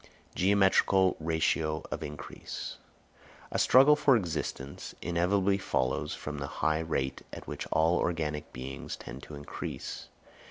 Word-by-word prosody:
Geometrical 95 -1 +4
Ratio 80 -1 0
of - - -3
Increase. 75 -1 -6 0.7
A - - 0
struggle 135 +4 +7
for 145 -3 +5
existence 80 -7 -4
inevitably 95 +3 +2
follows 65 -8 -1
from 75 -1 -5
the 70 - -3 0.2
high 80 0 +3
rate 75 -5 -2
at - - -8
which - - -5
all 80 +2 +3
organic 75 -3 -2
beings 65 +1 -6
tend 65 +3 -9
to 75 - -9
increase. 70 0 -6
80 Hz, 125 wpm, -30 LUFS, 75-95 Hz, 0.7 s, struggle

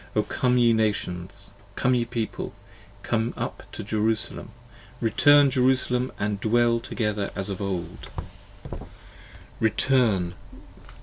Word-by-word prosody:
O 105 - +3
Come 125 +2 +1
ye 120 -1 +5
Nations, 100 -3 -2 0.2
Come 130 - +2
ye 120 -1 +1
People, 115 -2 -4 0.5
Come 115 +1 -1
up - - -5
to - - -6
Jerusalem. 110 +1 -1 0.5
Return, 140 +5 +5
Jerusalem, 130 -1 +1 0.2
& 100 -1 -3
dwell 115 +1 +3
together 105 -4 -2
as 95 +1 -2
of 100 0 -4
old: 90 -3 -4 1.5
Return, 110 -5 +2 0.5
8? - - -17
110 Hz, 115 wpm, -25 LUFS, 100-125 Hz, 1.5 s, ye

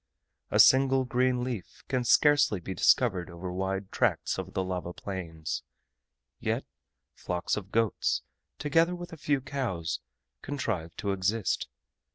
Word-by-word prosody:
A - - +1
single 130 0 +6
green 125 0 +1
leaf 120 -8 -5
can 130 -2 0
scarcely 145 -5 +5
be 95 +2 -5
discovered 95 -1 +3
over 90 +1 -6
wide 95 +1 -2
tracts - - +1
of - - -6
the 95 - +1
lava 90 -1 -3
plains; 85 -6 -5 0.8
yet - - -1 0.5
flocks 90 +1 -2
of 100 -1 -6
goats, 115 -2 +1 0.3
together 165 +4 +2
with 175 -1 -8
a - - -5
few 145 -3 0
cows, 125 - -2 0.4
contrive 110 - -3
to 100 - -2
exist. 95 +2 0
105 Hz, 135 wpm, -29 LUFS, 95-130 Hz, 0.8 s, single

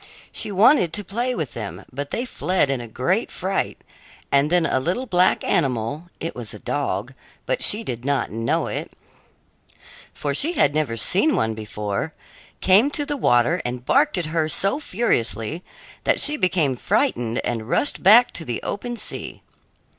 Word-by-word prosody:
She - - -5
wanted 195 - +4
to 205 - -3
play 240 +6 -2
with 155 -6 -4
them, 110 -4 -7
but 140 +2 -4
they 240 - -2
fled 180 - 0
in 135 -3 -2
a 120 - -8
great 175 - -1
fright; 190 +2 -2 0.5
and 140 +1 +3
then 175 -1 +3
a 130 - +1
little 180 - -2
black 180 -5 +2
animal 140 +3 -1
it 165 - -4
was 120 -3 -7
a - - -10
dog, - - -3 0.3
but - - -1
she 215 +2 +3
did 120 - -5
not 140 0 0
know 115 +2 0
it, - - -5 1.2
for 145 -1 -3
she 310 - -1
had 145 - +3
never 150 -7 -1
seen 195 - +3
one 110 0 0
before 105 +6 -4 0.5
came 200 +9 +5
to 290 0 -2
the 290 - -2
water 120 - +2
and 125 0 -5
barked 290 - +3
at 175 - -1
her 160 -2 +1
so 195 - +1
furiously 160 - -1 0.4
that - - +2
she 295 - +5
became 180 - +1
frightened 120 -1 0
and 115 -1 -3
rushed 290 - +1
back 225 +6 +7
to 165 - -7
the 120 -6 -3
open 240 +3 -4
sea. - - -6
160 Hz, 170 wpm, -22 LUFS, -, 1.2 s, back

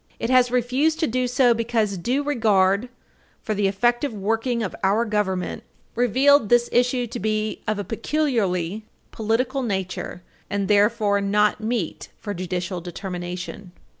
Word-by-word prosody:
It 230 - -2
has 255 -1 +5
refused 255 +6 +1
to - - +3
do 255 -1 0
so 245 -1 +4
because 225 -3 0
due 250 +11 -1
regard 215 -5 +2 0.5
for 215 - -1
the 205 -1 +1
effective 240 +7 +1
working 225 +3 -1
of 190 - -4
our 205 +5 +2
Government 205 -4 -1 0.3
revealed 255 +1 +4
this 240 0 +4
issue 245 0 +2
to 230 - -6
be 215 +1 -1
of 215 -1 0
a 205 - -3
peculiarly 220 - -1 0.3
political 240 +5 -1
nature, 190 -5 -4 0.3
and 200 -1 -1
therefore 205 -1 +3
not 210 +2 +2
meet 220 -6 -3
for 205 - -5
judicial 180 0 -3
determination. 180 +1 -6
215 Hz, 140 wpm, -23 LUFS, 195-245 Hz, 0.5 s, has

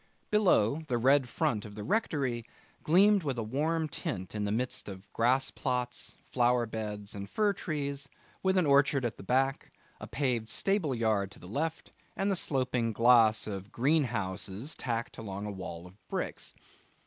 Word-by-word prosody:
Below, 160 - +3
the 125 -3 0
red 130 +1 +4
front 105 -3 0
of 105 -1 -10
the 105 - -6
rectory 140 - 0 0.4
gleamed 200 +5 +5
with 140 -6 -2
a 115 - -1
warm 155 +8 0
tint 95 -9 -4
in 105 -1 -2
the 100 - -1
midst 120 0 -2
of 95 0 -11
grass 130 +4 +2
plots, 125 -1 -3
flower 120 -1 +2
beds, 105 -2 -5
and 100 -1 -6
fir 210 - +2
trees, 140 -6 -3 0.3
with 190 0 +2
an 180 - +4
orchard 140 -2 +4
at 120 - -3
the - - -10
back, 135 +5 +1 0.3
a - - -7
paved 125 -5 -1
stable 185 - +1
yard 110 -4 +1
to 105 - -14
the 90 - -12
left, 155 - -3 0.2
and 200 +1 0
the - - +2
sloping 125 -7 0
glass 115 -1 +5
of 100 0 -6
greenhouses 115 - -1
tacked 115 -1 -3
along 100 -2 -5
a 105 - -3
wall 85 -3 -7
of 90 +1 -14
bricks. - - -4
125 Hz, 170 wpm, -30 LUFS, 105-145 Hz, 0.4 s, gleamed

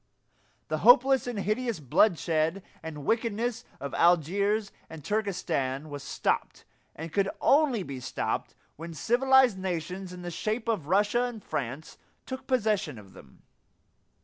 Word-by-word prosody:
The 155 0 -2
hopeless 250 - +6
and 245 -3 -3
hideous 215 +1 -1
bloodshed 165 - +2 0.2
and 150 -3 -7
wickedness 230 +1 -1
of 140 - -6
Algiers 200 +5 +2 0.2
and 160 -3 -10
Turkestan 155 -9 -2
was 145 -1 -6
stopped, 140 - -2 0.3
and 165 +1 -7
could 200 -1 +2
only 275 -8 +3
be 140 -5 -6
stopped, 125 - -3 0.2
when 165 +1 -8
civilized 250 - +4
nations 185 +1 -4
in 180 0 -9
the 175 - -5
shape 220 +7 -3
of 205 -11 -1
Russia 205 +7 +2
and 230 -5 -6
France 135 +4 -5 0.3
took 260 0 -7
possession 210 - 0
of 100 -3 -14
them. 65 - -17
195 Hz, 135 wpm, -28 LUFS, 155-230 Hz, 0.3 s, hopeless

